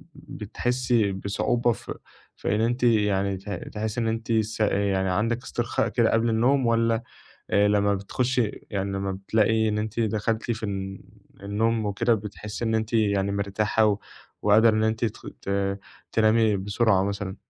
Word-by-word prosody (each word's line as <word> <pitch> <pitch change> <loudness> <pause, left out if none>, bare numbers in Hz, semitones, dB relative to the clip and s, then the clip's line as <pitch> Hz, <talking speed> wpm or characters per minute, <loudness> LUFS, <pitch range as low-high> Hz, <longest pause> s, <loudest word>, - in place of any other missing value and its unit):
بتحسّي 120 -4 -1
بصعوبة 115 +5 0
ف - - -6 0.5
في 105 - -1
إن 110 - +1
أنتِ 120 +2 0
يعني 100 -4 +2
ت 95 +2 -10
تحسّي 110 +3 -4
إن 115 - 0
أنتِ 115 +1 -2
س 110 0 0
يعني 100 -2 +1
عندِك 115 +6 0
استرخاء 120 0 -1
كده 115 -2 +2
قبل 115 +1 +2
النوم 125 +4 +2
والّا 115 0 +2 0.5
آآ 105 0 +4
لمّا 100 0 +2
بتخشي 120 +3 -1
يعني 100 -1 -2
لمّا 95 0 -2
بتلاقي 110 +3 +1
إن 105 - -1
أنتِ 110 +2 -3
دخلتِ 110 +1 -1
في 110 -1 -5
ال 95 -1 -5 0.4
النوم 110 +2 0
وكده 115 +4 +1
بتحسّي 105 +2 -6
إن 110 - +1
أنتِ 110 +1 -2
يعني 100 -3 +2
مرتاحة 105 +1 +1 0.4
وقادرة 110 +2 +5
إن 110 - +1
أنتِ 110 +1 +1
تخ 110 - -6 0.2
ت - - -7 0.6
تنامي 110 -1 +3
بسرعة 100 0 +2
مثلًا؟ 100 -1 -3
110 Hz, 155 wpm, -25 LUFS, 100-115 Hz, 0.6 s, وقادرة